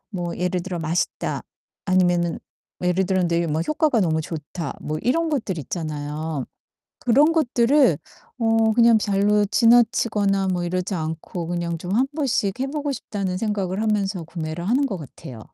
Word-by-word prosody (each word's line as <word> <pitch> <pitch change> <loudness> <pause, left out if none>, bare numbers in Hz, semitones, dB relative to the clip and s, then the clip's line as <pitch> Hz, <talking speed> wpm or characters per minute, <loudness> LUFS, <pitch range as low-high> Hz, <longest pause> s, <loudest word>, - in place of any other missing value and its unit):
뭐 175 -2 -3
예를 180 0 -1
들어 180 0 -4
"맛있다." 165 +2 -1 0.4
아니면은 175 -2 +2 0.4
예를 180 +1 +2
들어 185 -1 +2
네 170 0 +1
뭐 155 +1 0
"효과가 305 - +1
너무 160 -3 +1
좋다." 160 +2 -5
뭐 155 +1 -3
이런 325 +8 +1
것들 225 - -2
있잖아요. 150 -1 -4 0.6
그런 285 +7 +4
것들을 260 - +3 0.4
어 225 -1 +3
그냥 235 -2 +6
별로 205 0 +2
지나치거나 225 -4 +3
뭐 180 -1 -1
이러지 180 +2 -2
않고 160 +1 -4
그냥 170 -1 -2
좀 180 +3 -5
한번씩 260 -5 0
해 270 - +1
보고 290 0 -2
싶다는 195 -7 -3
생각을 200 -3 -1
하면서 205 -4 0
구매를 165 +1 -5
하는 265 +5 +3
것 195 -8 -4
같아요. 130 -5 -10
190 Hz, 315 characters per minute, -23 LUFS, 170-230 Hz, 0.6 s, 그냥